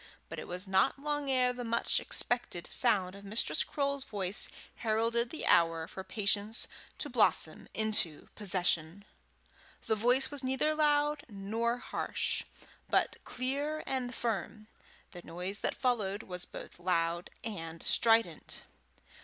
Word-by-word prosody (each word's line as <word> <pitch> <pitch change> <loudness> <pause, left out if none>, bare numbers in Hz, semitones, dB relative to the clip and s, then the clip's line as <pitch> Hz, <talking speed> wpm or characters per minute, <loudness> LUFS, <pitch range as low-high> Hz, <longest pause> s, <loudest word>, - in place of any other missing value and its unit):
But - - -5
it - - -7
was 180 +2 -4
not 190 +9 +3
long 290 0 -2
ere 250 -1 +4
the 245 0 -5
much 235 0 +2
expected 235 -8 -1
sound 195 -7 +2
of 200 0 -11
Mistress 210 +3 +1
Croale's 280 -2 -1
voice 200 -4 0 0.3
heralded 230 +1 +2
the 315 - -4
hour 165 -1 +4
for 190 - -7
patience 205 +2 0 0.3
to - - -3
blossom - - +2
into 210 -8 +1
possession. 180 -2 +1 0.8
The - - +2
voice 245 +6 +3
was 285 -2 -2
neither 265 +4 +2
loud 295 -1 +2
nor 225 +4 -1
harsh, 245 - -2 0.5
but - - +2
clear 285 +4 -1
and 255 -2 -2
firm; 215 -1 -3 0.4
the 175 - -9
noise 180 +4 -3
that - - -1
followed 215 -6 0
was 180 -1 -4
both - - -10
loud 170 -1 0
and 165 -7 -5
strident. 225 0 +2
220 Hz, 135 wpm, -32 LUFS, 190-255 Hz, 0.8 s, ere